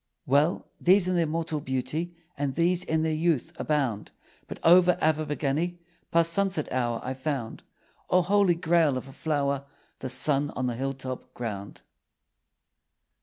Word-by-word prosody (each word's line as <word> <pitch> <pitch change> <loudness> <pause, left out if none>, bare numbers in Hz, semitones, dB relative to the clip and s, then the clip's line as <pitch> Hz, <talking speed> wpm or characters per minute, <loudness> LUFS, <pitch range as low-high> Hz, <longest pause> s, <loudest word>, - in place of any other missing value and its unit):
Well: 145 +6 +2
these 185 +1 +4
in 185 - +1
their 170 -2 +2
mortal 160 0 -2
beauty, 140 +6 -3 0.2
And 140 -2 -2
these 175 +2 +2
in 160 -3 0
their 160 -1 0
youth, 160 -3 0
abound. 135 -9 -1 0.4
But - - -7
over 180 +1 +6
Abergavenny, 155 +2 0 0.3
Past 165 0 +3
sunset 190 -4 +1
hour, 120 -2 0
I 130 - -3
found 130 -4 -4 0.5
(O 180 - +4
Holy 195 -1 +3
Grail 165 -5 +2
of 130 - -6
a 135 - -12
flower!) 140 -3 -1 0.4
The 130 - -4
sun 145 +2 +2
on 130 - -1
the 120 -2 -1
hilltop 130 0 -5
ground. 100 -4 -6
155 Hz, 145 wpm, -27 LUFS, 130-170 Hz, 0.5 s, over